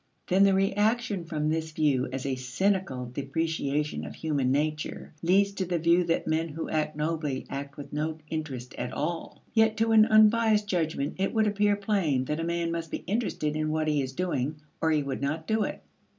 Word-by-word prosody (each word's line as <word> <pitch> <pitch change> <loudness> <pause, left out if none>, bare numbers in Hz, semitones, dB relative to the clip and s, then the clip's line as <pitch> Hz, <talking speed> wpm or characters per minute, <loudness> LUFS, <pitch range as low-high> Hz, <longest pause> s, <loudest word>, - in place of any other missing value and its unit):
Then 190 +2 +4
the 195 -1 +4
reaction 205 0 +1
from 155 -2 -2
this 160 0 -1
view 145 -5 +2
as 135 0 -4
a 135 - 0
cynical 130 +2 -1
depreciation 145 - -1
of 75 -1 -7
human 140 -5 0
nature 150 +3 -2
leads 195 +4 +3
to 195 -1 -3
the 175 -1 0
view 170 +2 +4
that 165 0 0
men 160 +1 0
who 160 +2 -5
act 155 -1 0
nobly 150 -3 -2
act 140 0 -5
with 145 - -9
no 155 +1 -2
interest 140 -6 -5
at - - -3
all. 170 -1 -4
Yet 220 -1 +3
to 225 0 +2
an 220 0 +7
unbiased 215 0 +5
judgment 160 -6 -1
it 195 +4 0
would 220 -1 +4
appear 205 0 +2
plain 195 -11 0
that 150 +4 -2
a - - -1
man 170 0 -1
must 165 -1 -3
be - - -5
interested 185 -7 -1
in 155 0 0
what 155 0 0
he 150 -2 +2
is 130 0 -4
doing 155 -4 -1 0.3
or 160 - +2
he 155 -2 +2
would 135 -1 -4
not 155 +3 -2
do 220 +3 +1
it. - - -6
160 Hz, 200 wpm, -28 LUFS, 145-195 Hz, 0.3 s, an